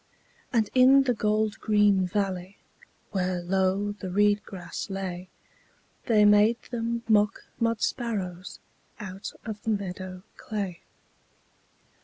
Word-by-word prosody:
And 225 -4 +2
in 265 +2 +7
the 250 -2 +1
gold 215 -1 0
green 205 -3 +3
valley, 190 -1 -2 0.5
Where 185 -2 -1
low 190 +3 0
the 205 -2 -7
reed 205 +2 +3
grass 185 0 -7
lay, 185 -2 -5 0.8
They 215 -3 +5
made 210 +3 +5
them 235 -1 -2
mock 210 -2 +3 0.2
mud 230 -1 0
sparrows 195 -7 -3 0.4
Out 195 0 -7
of 215 -2 -5
the - - -3
meadow 185 -3 -4
clay. 200 -5 -4
205 Hz, 115 wpm, -27 LUFS, 185-220 Hz, 0.8 s, in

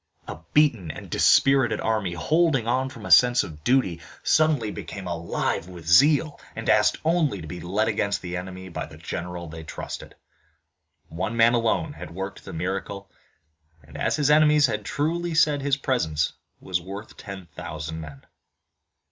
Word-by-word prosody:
A - - -7
beaten 125 - +3
and - - -8
dispirited 135 -4 +4
army, 110 -5 -1
holding 155 - +2
on 130 +2 +1
from - - -11
a - - -5
sense 125 0 +6
of 75 -2 -10
duty, 95 -9 +1 0.2
suddenly 150 -9 +2
became 95 -2 -7
alive 85 0 -2
with 90 -3 -11
zeal, 145 - +4 0.2
and 115 - -6
asked 105 -1 +4
only 160 - +1
to 80 - -8
be 90 +3 -7
led 100 +5 0
against 100 -3 -1
the 90 0 -4
enemy 95 +1 -6
by 85 - -5
the 80 0 -13
general 85 +1 -5
they 80 +1 -9
trusted. 80 - -8 0.9
One 100 +8 -3
man 115 +1 +5
alone 120 +6 +1
had 85 - -10
worked 95 +1 -6
the - - -7
miracle 95 +3 -4 0.7
and 75 - -17
as - - 0
his 150 -1 +2
enemies 150 -1 +5
had 105 -4 -2
truly 165 +5 -1
said 150 -2 +3
his 140 0 +1
presence 80 - 0 0.3
was 90 -2 -2
worth 100 +4 -9
ten 100 -2 -9
thousand 80 +1 -6
men. 70 -3 -11
105 Hz, 165 wpm, -25 LUFS, 85-135 Hz, 0.9 s, sense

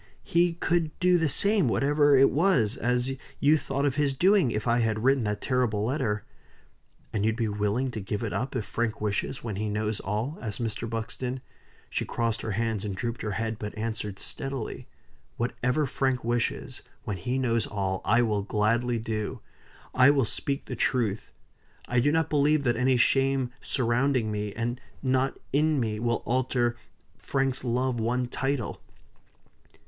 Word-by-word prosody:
He 170 0 +2
could 165 -2 -1
do 180 -1 +4
the 160 -2 +2
same, 200 +2 +4
whatever 145 +3 +4
it 135 +1 +6
was, 135 - +2
as 125 +1 0 0.3
you 150 +2 +5
thought 140 -1 -1
of 135 -1 0
his 145 -2 +1
doing, 190 -2 +4
if 105 +1 -2
I 120 +1 +3
had 110 -1 0
written 135 -2 +3
that 105 0 -2
terrible 120 -5 +1
letter." 115 -5 -1 0.9
"And 105 - 0
you'll 110 0 +2
be 115 -1 0
willing 105 +5 0
to 110 - -5
give 105 +3 -3
it 110 - -3
up, 125 +8 -2
if 115 -4 -1
Frank 115 -1 -2
wishes, 105 +4 -2
when 110 -4 -4
he 105 +1 -2
knows 105 0 -1
all?" 110 +10 -3
asked 105 -4 -4
Mr. 115 0 -2
Buxton. 125 +3 -3 0.5
She - - -2
crossed 115 -1 -1
her 110 - -3
hands 110 -1 -1
and 100 -3 -3
drooped 120 +4 -3
her 105 -2 -2
head, 110 +1 -2
but 105 0 -6
answered 110 -2 -3
steadily. 135 +1 -4 0.5
"Whatever 125 +4 0
Frank 130 -1 0
wishes, 120 +2 -1 0.2
when 105 -5 -3
he 125 +9 -2
knows 115 -4 +1
all, 95 -2 -2
I 120 +3 +4
will 105 -3 +1
gladly 115 +4 +1
do. 110 -2 -3 0.5
I 130 +2 +6
will 140 -3 +3
speak 140 +5 -2
the 125 - -5
truth. 115 -4 0 0.6
I 125 - +2
do 145 +4 +3
not 160 -1 +2
believe 150 0 +3
that 120 -3 +2
any 130 +2 +3
shame 135 0 +2
surrounding 125 -1 +1
me, 105 0 -2
and 120 +3 -3 0.2
not 130 0 +1 0.2
in 150 +1 +3
me, 110 -3 -1
will 120 0 0
alter 125 -1 +1 0.4
Frank's 135 -1 -1
love 125 0 0
one 125 +3 0
title." 135 -1 -2
120 Hz, 170 wpm, -27 LUFS, 110-135 Hz, 0.9 s, it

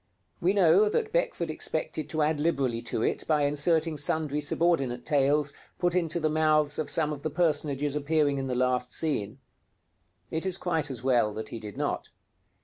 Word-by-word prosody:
We 180 +3 +2
know 195 +2 +5
that 435 - -1
Beckford 175 - 0
expected 155 -1 -3
to 155 -2 0
add 150 0 +1
liberally 135 -7 0
to 115 -1 -3
it - - -1
by 150 -2 +2
inserting 155 +2 +1
sundry 150 0 +1
subordinate 140 -6 0
tales, 145 0 +2 0.2
put 175 -1 +1
into 170 -2 +1
the 155 - +1
mouths 155 -1 +2
of 155 - -2
some 155 -2 +1
of 145 - -8
the 155 - -2
personages 145 -3 0
appearing 145 -1 +1
in 135 - -3
the 125 - -2
last 125 0 0
scene. 130 -9 -2 0.9
It 160 0 -2
is 190 -1 -1
quite 165 -6 -1
as 125 -3 -6
well 120 -5 +3
that 110 0 -5
he 115 - -6
did 105 -2 -9
not. - - -2
150 Hz, 180 wpm, -28 LUFS, 135-160 Hz, 0.9 s, know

